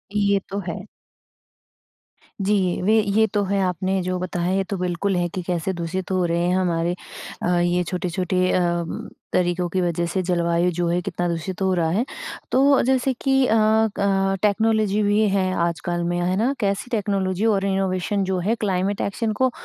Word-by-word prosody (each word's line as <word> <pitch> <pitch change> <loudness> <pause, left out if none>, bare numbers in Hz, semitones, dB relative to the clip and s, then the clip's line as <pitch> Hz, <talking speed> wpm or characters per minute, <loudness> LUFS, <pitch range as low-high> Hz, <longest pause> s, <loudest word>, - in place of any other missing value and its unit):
ये 200 -1 +3
तो 200 - -3
है। 170 +2 -4 1.6
जी, 195 -3 +1
वे 215 +4 +4
ये 210 +2 +2
तो 205 -1 +2
है। 200 +1 0
आपने 185 +1 0
जो 185 0 -1
बताया, 180 0 -2
ये 195 - +1
तो 195 +1 -4
बिल्कुल 180 +2 -1
है 175 -1 +1
कि 185 - -4
कैसे 180 +1 -1
दूषित 180 +2 -4
हो 185 -1 +1
रहे 170 0 0
हैं 180 - +2
हमारे 175 -1 0 0.5
अ, - - 0
ये 175 +1 +1
छोटे-छोटे 180 +1 -1
अ, - - +2 0.7
तरीकों 175 0 +1
की 185 - +1
वज़ह 175 -1 0
से 190 - 0
जलवायु 170 0 +1
जो 175 -1 +1
है 175 +1 +1
कितना 175 0 -2
दूषित 170 +3 -4
हो 190 -1 +2
रहा 170 -3 +1
है। 205 +9 +1 0.5
तो 275 +1 +4
जैसे 260 +1 +2
कि 270 -1 +3
अ, - - +2
अ, 205 -3 +2
टेक्नोलॉजी 215 0 +2
भी 205 +1 +3
है 190 -1 +1 0.2
आजकल 175 +1 -3
में। 175 0 -1
है 180 +1 +1
ना? 240 +6 +1
कैसी 200 +2 -1
टेक्नोलॉजी 200 -2 0
और 200 -3 +2
इनोवेशन 195 0 0
जो 190 -1 -1
है 205 +6 0
क्लाइमेट 195 -2 -1
एक्शन 220 +3 -1
को 260 +3 +1
190 Hz, 180 wpm, -22 LUFS, 175-205 Hz, 1.6 s, वे